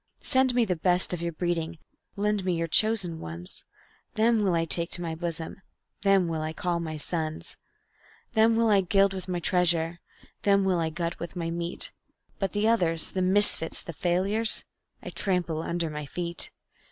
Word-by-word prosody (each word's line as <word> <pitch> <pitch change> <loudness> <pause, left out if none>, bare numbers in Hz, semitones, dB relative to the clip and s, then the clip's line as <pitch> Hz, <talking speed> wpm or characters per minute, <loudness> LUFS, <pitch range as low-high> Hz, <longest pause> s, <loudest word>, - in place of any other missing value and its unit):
Send 260 -2 +2
me 240 -2 +4
the 185 -4 0
best 180 +2 +1
of 175 - -3
your 170 0 -1
breeding, 170 0 -2 0.4
lend 210 0 0
me 180 -1 +1
your 165 0 0
chosen 180 -1 +2
ones; 85 +2 -7 0.5
Them 225 0 +3
will 190 -4 +2
I 165 0 +1
take 170 +1 +2
to 175 - -4
my 165 -1 -3
bosom, 165 +2 -5 0.4
them 195 -3 +4
will 160 -1 -2
I 155 0 -3
call 175 +1 -1
my 160 -2 -4
sons; 155 0 -3 0.8
Them 225 0 +5
will 230 -1 +3
I 200 -2 +5
gild 195 +2 +3
with 190 -1 -6
my 180 -1 -1
treasure, 170 -1 +2 0.4
them 200 -1 +4
will 185 -2 +2
I 165 -1 0
glut 170 +1 -3
with 170 +2 -6
my 165 -2 -2
meat; 170 0 -2 0.5
But 195 - -1
the 210 +1 +2
others 170 -8 +2
the 185 - -1
misfits, 185 -3 +2
the 170 - -8
failures 195 +7 +2 0.4
I - - -6
trample 175 -5 -1
under 170 -1 -2
my 150 -1 -5
feet. 170 +2 -2
175 Hz, 180 wpm, -27 LUFS, 165-195 Hz, 0.8 s, Them